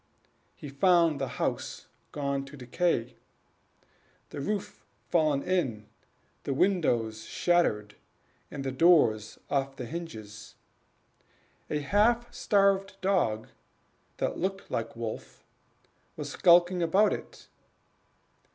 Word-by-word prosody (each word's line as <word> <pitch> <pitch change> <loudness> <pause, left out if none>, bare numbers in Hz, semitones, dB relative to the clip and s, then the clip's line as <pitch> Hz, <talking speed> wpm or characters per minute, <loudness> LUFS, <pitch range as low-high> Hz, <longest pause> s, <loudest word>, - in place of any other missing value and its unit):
He - - -9
found 165 +1 +3
the 135 - 0
house - - -3 0.3
gone 140 -1 -2
to 140 +2 -12
decay 125 -2 -1 1.1
the 145 - -5
roof 205 +6 -4 0.3
fallen 155 -5 +2
in, 130 - -1 0.5
the 135 - -3
windows 120 - +1
shattered, 105 - +1 0.5
and 140 - -6
the 135 - -2
doors 130 -8 +3
off 135 -1 -1
the 130 - -6
hinges. 110 -9 -8 1.1
A 150 - -1
half 235 +8 +2
starved 195 -1 +2
dog 175 - 0 0.7
that - - -2
looked 195 +1 -3
like 115 0 -3
Wolf 115 -1 -7 0.7
was - - -6
skulking 175 +1 +4
about 190 +6 +3
it. - - -9
150 Hz, 105 wpm, -29 LUFS, 120-185 Hz, 1.1 s, skulking